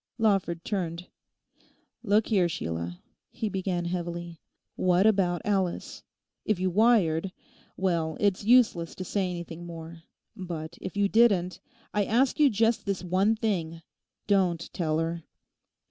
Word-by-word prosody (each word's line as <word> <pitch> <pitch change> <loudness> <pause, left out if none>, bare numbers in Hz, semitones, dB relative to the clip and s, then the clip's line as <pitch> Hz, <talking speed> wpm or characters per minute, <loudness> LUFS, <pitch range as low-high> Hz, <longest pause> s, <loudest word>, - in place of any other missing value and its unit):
Lawford 195 -7 +1
turned. 175 -4 -3 1.0
'Look 210 -1 +2
here, 190 -6 +3
Sheila,' 85 - -5 0.3
he 220 - -3
began 185 -3 -2
heavily, 170 -1 -4 0.4
'what 185 +1 +3
about 190 -5 +2
Alice? 190 -4 -1 0.4
If 215 -4 0
you 185 0 0
wired: 195 -5 +3 0.5
well, 170 -4 0
it's 200 -2 +1
useless 220 -8 +3
to 185 - -5
say 190 0 -1
anything 170 -1 -6
more. 165 0 -9 0.3
But 170 -4 -6
if 195 - -6
you 200 0 +3
didn't, 200 -5 +3 0.3
I 210 - +2
ask 250 +8 +2
you 295 -2 +6
just 225 +1 +1
this 195 -2 -2
one 190 +5 +2
thing. 170 -7 -2 0.4
Don't 180 -5 +1
tell 155 -3 0
her! 165 +1 -2
185 Hz, 130 wpm, -27 LUFS, 170-205 Hz, 1.0 s, you